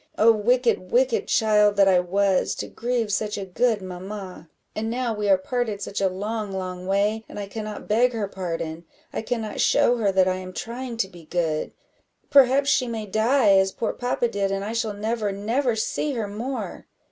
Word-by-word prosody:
Oh, 225 +2 +6
wicked, 230 -3 +1
wicked 250 -1 +2
child 210 -2 +3
that 200 -1 +5
I 185 -2 +5
was, 190 +1 +1
to - - -5
grieve 235 -3 -2
such 210 +1 -1
a 200 - -4
good 215 +2 0
mamma! 185 -2 -8 0.3
and 220 +1 -2
now 240 0 -1
we 210 -1 -2
are 190 - +6
parted 220 +1 -2
such 200 0 -4
a 195 - +3
long, 210 +2 -4
long 185 -1 -5
way, 205 +3 +1
and - - -7
I 200 - -3
cannot 215 0 -6
beg 235 +4 +3
her 215 -3 -2
pardon 165 -4 -5 0.3
I - - -2
cannot 225 -2 -3
show 245 - +4
her 210 -4 +1
that 190 -1 +3
I 185 0 +1
am 185 0 -8
trying 240 +2 -5
to 200 - 0
be 175 -4 -14
good; 160 -2 -1 0.6
perhaps 275 +1 +5
she 255 - +2
may 225 -2 -4
die, 220 +1 +3
as 190 0 +2
poor 230 - -2
papa 245 -1 0
did, 200 -3 -1
and 195 0 -2
I 220 - -4
shall 230 -2 -1
never, 215 0 -2
never 230 +5 0
see 280 +6 -1
her 225 -4 -2
more." 235 +7 -5
210 Hz, 195 wpm, -24 LUFS, 195-230 Hz, 0.6 s, Oh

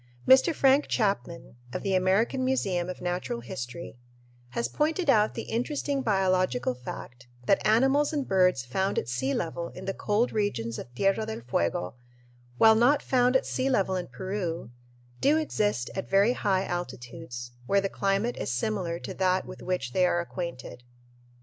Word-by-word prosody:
Mr. 265 +6 +7
Frank 275 -1 +3
Chapman, 195 - -2 0.2
of - - -4
the 195 - 0
American 195 +8 +2
Museum 195 -9 0
of 185 - -6
Natural 175 -9 -2
History, 120 +3 -7 0.5
has 120 -1 -2
pointed 310 - +1
out 215 -3 +3
the - - -4
interesting 275 +4 -2
biological 185 - +1
fact 125 -1 -9 0.2
that 195 - +3
animals 270 +7 +3
and 285 -4 -2
birds 180 -9 +3
found 190 +11 -1
at - - -1
sea 125 +3 -1
level 170 +2 -2
in 185 - -8
the 195 - -2
cold 210 +5 0
regions 120 - -2
of 120 - -9
Tierra 195 - +1
del 220 - -5
Fuego, 90 -5 -1 0.6
while 220 - +7
not 245 +6 +3
found 250 0 +2
at 260 - +3
sea 260 +1 -1
level 195 -7 +1
in 180 -1 -3
Peru, 185 - -4 0.5
do 295 +3 +4
exist 210 - -1
at 190 - -5
very 200 +5 +4
high 195 -5 0
altitudes, 125 -6 -6 0.2
where 200 - +3
the 195 - 0
climate 195 +5 -1
is - - -3
similar 170 - -1
to - - -7
that 185 0 +1
with - - -10
which 180 -9 -3
they 185 -1 +3
are 175 - +1
acquainted. 170 -8 -6
190 Hz, 165 wpm, -27 LUFS, 165-225 Hz, 0.6 s, Mr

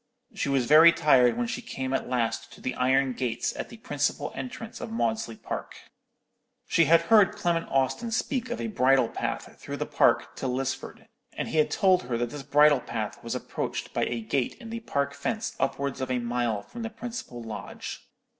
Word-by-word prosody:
She - - -2
was 135 -3 +2
very 155 +5 +8
tired 130 -7 +4
when 240 - 0
she 245 +1 -4
came 130 - -4
at 135 - -1
last 120 -3 -1
to - - -14
the 130 - -3
iron 130 +1 +2
gates 120 -2 -2
at - - -5
the 230 - -11
principal 145 -6 -1
entrance 230 -3 -7
of - - -5
Maudesley 115 - -1
Park. - - -6 0.9
She 170 - +4
had 165 +2 +6
heard 200 +2 +5
Clement 170 -1 0
Austin 135 - 0
speak 250 +2 -1
of 240 - -3
a - - -2
bridle 135 - +3
path - - -4
through - - -5
the - - -2
park - - +2
to 135 - -2
Lisford, 130 +1 -3 0.3
and - - -4
he 160 - +1
had 155 - +3
told 190 -2 +3
her 125 -1 -3
that 120 0 -2
this 145 - -6
bridle 145 0 +5
path 110 -3 -5
was 115 +1 -3
approached 125 - -4
by - - +1
a 120 -1 -3
gate 120 +3 -1
in 230 -3 -10
the 230 - -3
park 140 -10 -1
fence 225 +4 -3
upwards 140 -1 -1
of 130 - -2
a 130 - +1
mile 120 -3 -1
from 235 - -9
the 225 - -3
principal 230 - -7
lodge. 110 -2 -7
140 Hz, 200 wpm, -27 LUFS, -, 0.9 s, very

